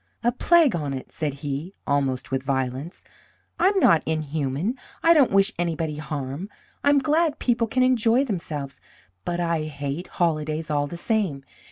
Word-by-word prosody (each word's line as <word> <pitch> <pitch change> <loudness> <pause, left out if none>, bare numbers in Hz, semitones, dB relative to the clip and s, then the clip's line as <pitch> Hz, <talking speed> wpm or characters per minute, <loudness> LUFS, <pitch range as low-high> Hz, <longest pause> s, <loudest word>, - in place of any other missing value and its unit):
"A 240 - +3
plague 310 - +4
on 145 -4 -2
it!" 130 - -8
said 150 -4 -3
he, 145 +7 -4
almost 135 -3 0
with 135 0 0
violence. 135 +4 -3 0.6
"I'm 390 +3 +3
not 165 - +5
inhuman. 155 - -1 0.3
I 335 - +7
don't 290 -6 +5
wish 195 +2 +4
anybody 165 -3 -1
harm. 150 +4 -5 0.3
I'm 285 0 +5
glad 310 +2 +2
people 235 -2 +1
can 255 +3 +2
enjoy 250 0 +3
themselves. 150 - -4 0.4
But 175 0 -2
I 165 -2 0
hate 145 +3 -4
holidays 155 -2 -1
all 145 -1 +1
the 170 - -7
same. 185 - -1
165 Hz, 155 wpm, -24 LUFS, 145-230 Hz, 0.6 s, I